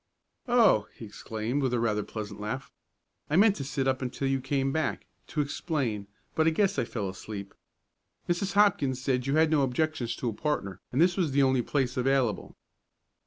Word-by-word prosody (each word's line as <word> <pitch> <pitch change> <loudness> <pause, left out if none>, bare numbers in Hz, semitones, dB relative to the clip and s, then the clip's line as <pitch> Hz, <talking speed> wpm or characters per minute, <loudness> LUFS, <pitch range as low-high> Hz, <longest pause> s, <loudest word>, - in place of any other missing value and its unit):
"Oh!" 225 - +4
he 115 - -9
exclaimed 110 +5 -3
with 130 -2 +1
a - - +1
rather 110 -2 +1
pleasant 105 -1 -6
laugh. 115 +6 -4 0.6
"I 150 - +1
meant 205 +2 +6
to 140 - -4
sit 135 -1 -2
up 130 0 +1
until 130 +2 -2
you 135 0 0
came 135 0 0
back, 155 +2 -1 0.2
to 150 - -1
explain, 140 - -2 0.3
but 160 0 +2
I - - +7
guess 195 +4 +1
I - - +1
fell 105 -5 -3
asleep. 100 +1 -7 0.7
Mrs. 175 +2 -1
Hopkins 175 -11 +3
said 130 -1 0
you 140 - +1
had 160 0 +4
no 155 -2 +4
objections 135 -2 0
to 125 - -2
a - - -4
partner, 100 - -2
and 130 - -1
this 175 +2 +4
was 165 -7 +1
the 140 0 +4
only 130 -1 +3
place 130 -1 -1
available." 130 -4 0
135 Hz, 190 wpm, -28 LUFS, 115-155 Hz, 0.7 s, I